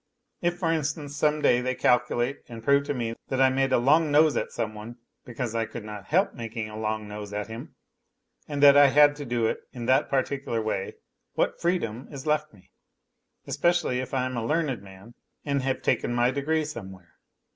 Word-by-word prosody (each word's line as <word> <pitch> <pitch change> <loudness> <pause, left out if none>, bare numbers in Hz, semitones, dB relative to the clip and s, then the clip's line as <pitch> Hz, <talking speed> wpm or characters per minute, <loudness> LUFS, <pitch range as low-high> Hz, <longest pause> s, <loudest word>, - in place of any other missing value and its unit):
If, 175 0 0
for 170 -2 0
instance, 150 -2 -2
some 150 0 +1
day 120 - +4
they 130 0 -1
calculate 125 +2 +1
and 115 -1 -9
prove 140 +2 +3
to 145 - -1
me 115 -2 -2
that 130 - -2
I 135 0 +5
made 135 0 +1
a - - +4
long 150 +6 +3
nose 150 +1 +4
at - - -1
some 110 -2 -3
one 110 +3 -9 0.3
because 120 -1 -4
I 115 -1 -1
could 120 - -8
not 105 -2 -8
help 185 +6 +2
making 115 -2 -5
a - - -9
long 110 0 -3
nose 105 0 -7
at 105 0 -2
him 115 +1 -9 0.7
and 145 -1 -2
that 140 -1 +9
I 145 0 +8
had 145 +1 +5
to 145 - -6
do 120 -2 0
it - - 0
in 120 -2 -6
that 130 +2 +3
particular 135 -3 -1
way, 110 -3 -3 0.4
what - - -1
freedom 135 -9 -1
is 140 -1 -8
left 155 0 0
me, 100 -4 -22 0.7
especially 175 -7 +1
if 130 0 -5
I 130 -1 +1
am 130 0 -4
a 115 - -2
learned 150 -4 -1
man 95 +4 -14 0.3
and 140 -2 0
have 135 0 -2
taken 120 - 0
my 120 +1 +3
degree 155 +3 0
somewhere 95 - -10
130 Hz, 205 wpm, -26 LUFS, 115-145 Hz, 0.7 s, that